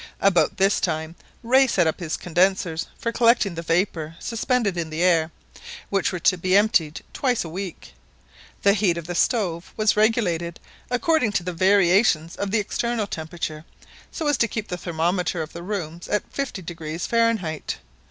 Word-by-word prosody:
About 195 -3 +3
this 195 +1 +3
time, 160 +1 -2 0.3
Rae 260 +3 +5
set 185 -7 +2
up 160 - 0
his 165 -3 -3
condensers 175 -1 +1
for 230 - -2
collecting 230 -5 +3
the 165 - -5
vapour 165 -2 -1
suspended 230 -3 -1
in 170 -2 -3
the 160 +2 -2
air, 165 -3 +3 0.6
which 195 -1 +1
were 180 - -3
to 185 +2 +3
be 185 +2 +3
emptied 195 -8 +2
twice 250 -4 0
a - - -6
week. 185 +1 -7 0.7
The 200 - +6
heat 195 -5 +1
of 170 - -5
the 175 - -4
stove 175 -4 0
was 215 -1 +3
regulated 185 -7 +1 0.3
according 245 -2 +1
to 185 - 0
the 180 0 -4
variations 185 -2 +3
of 200 - -3
the 220 - +1
external 225 +2 -1
temperature, 160 -3 -5 0.5
so 320 - -5
as 290 -2 +2
to 230 - +3
keep 215 0 -5
the 180 - -3
thermometer 175 0 -1
of 155 - -10
the 170 - -7
rooms 175 -3 -5
at 210 - -2
50° 170 - -4
Fahrenheit. 225 -9 0
185 Hz, 170 wpm, -23 LUFS, 165-215 Hz, 0.7 s, The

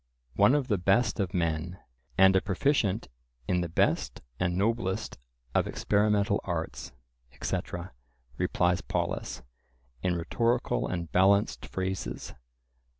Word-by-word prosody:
"One 105 +8 +5
of 140 -3 0
the 105 -6 +1
best 100 +7 +2
of 95 -3 0
men, 85 +1 -1 0.4
and 95 0 +7
a 95 - +5
proficient 105 +1 +1 0.4
in 90 -1 +1
the 85 - -3
best - - 0 0.2
and 90 -1 0
noblest 105 -1 -1 0.3
of - - +2
experimental 105 -1 +1
arts," 80 -7 -4 0.4
etc., 85 +6 -4 0.4
replies 90 +7 +1
Polus, - - -3 0.6
in 90 -1 +1
rhetorical 115 +8 0
and 85 -2 -4
balanced 100 +3 +3
phrases. 95 0 -4
95 Hz, 115 wpm, -29 LUFS, 90-105 Hz, 0.6 s, and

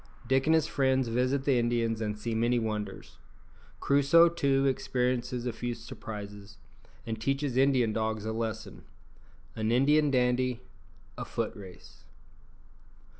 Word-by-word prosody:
_Dick 135 +2 +2
and 160 - +5
his 160 - +2
friends 130 -3 +1
visit 130 +4 0
the 135 -4 +3
Indians 115 -1 0
and 105 -1 -2
see 115 +2 -4
many 120 +2 +1
wonders 105 -3 -4 0.6
Crusoe, 145 +5 +5
too, 140 -5 +1
experiences 125 -2 -1
a 120 - -2
few 120 +1 -4
surprises, 105 -2 -9 0.5
and 110 -1 -5
teaches 135 +1 -1
Indian 130 -4 +3
dogs 110 -1 -2
a 110 - -2
lesson 110 -1 -5 0.7
An 110 0 -1
Indian 145 +4 +4
dandy 125 -1 +1 0.6
A - - -3
foot - - -3
race. 95 -3 -13
125 Hz, 130 wpm, -29 LUFS, 110-135 Hz, 0.7 s, and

